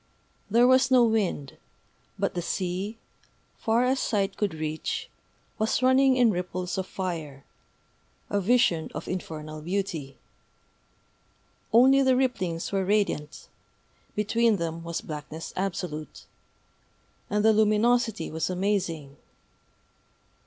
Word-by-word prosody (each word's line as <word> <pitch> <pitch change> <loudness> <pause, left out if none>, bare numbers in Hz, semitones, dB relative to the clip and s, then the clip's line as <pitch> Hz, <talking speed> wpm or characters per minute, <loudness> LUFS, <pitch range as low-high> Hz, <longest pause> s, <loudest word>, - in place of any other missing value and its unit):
There 235 +4 +5
was 260 0 +5
no 255 -2 +6
wind; 205 -11 0 0.6
but - - -1
the 175 - -2
sea, 185 +5 -3 0.6
far 230 +2 +2
as 260 +1 +1
sight 200 -4 0
could 200 -6 -1
reach, 155 0 -4 0.5
was 220 +3 +1
running 260 +1 +5
in 240 -3 +5
ripples 180 0 -3
of 190 - -3
fire, 160 -7 -5 0.8
a 205 - 0
vision 190 -6 +2
of - - -6
infernal 155 -4 -5
beauty. 170 -6 -3 1.5
Only 265 +4 +6
the 260 -1 +4
ripplings 185 -11 -1
were 195 -1 +1
radiant 190 -7 -1 0.7
(between 225 +2 +2
them 165 -2 -4
was 170 0 -4
blackness 155 +1 -7
absolute); 170 -6 -4 1.0
and 210 +1 +1
the 220 - +6
luminosity 220 +2 +2
was 160 +2 -2
amazing. 180 -7 -2
195 Hz, 110 wpm, -27 LUFS, 165-225 Hz, 1.5 s, no